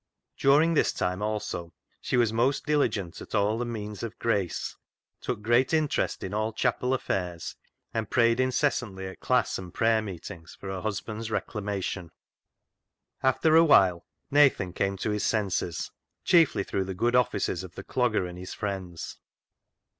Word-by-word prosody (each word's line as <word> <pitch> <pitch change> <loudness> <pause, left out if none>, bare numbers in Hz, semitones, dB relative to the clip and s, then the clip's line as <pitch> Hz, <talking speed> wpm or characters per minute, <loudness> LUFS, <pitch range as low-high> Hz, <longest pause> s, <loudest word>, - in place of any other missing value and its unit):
During 150 +5 +4
this 155 - +3
time, 90 +2 -1
also, 105 -5 -3 0.3
she - - 0
was 115 -3 +3
most 125 +5 +1
diligent 140 - 0
at - - -6
all 105 +2 +2
the 120 - -1
means 105 -3 -5
of 115 -2 -5
grace, 100 -7 -1 0.4
took 105 -4 -4
great 120 +7 +3
interest 155 -2 0
in 95 - -4
all 110 +1 -1
chapel 125 +1 +1
affairs, 90 -8 -3 0.4
and 110 -2 -2
prayed 115 0 +3
incessantly 125 -7 0
at 95 - -8
class - - +1
and 90 -1 -8
prayer 110 +3 +2
meetings 90 -4 -8
for 95 - -7
her 95 -1 -4
husband's 110 +1 -4
reclamation. 100 -5 -3 1.1
After 140 +4 +3
a 165 - +8
while, 95 - +4 0.2
Nathan 135 -11 +4
came 100 +1 -1
to 105 - -2
his 105 0 -1
senses, 95 -5 -1 0.3
chiefly 165 - +4
through 95 -1 -2
the 95 0 -5
good 120 +6 +1
offices 120 -7 +1
of 90 -2 -10
the 95 - -7
Clogger 115 -7 +1
and 90 0 -8
his 90 - -7
friends. 95 -5 -5
105 Hz, 155 wpm, -27 LUFS, 95-125 Hz, 1.1 s, a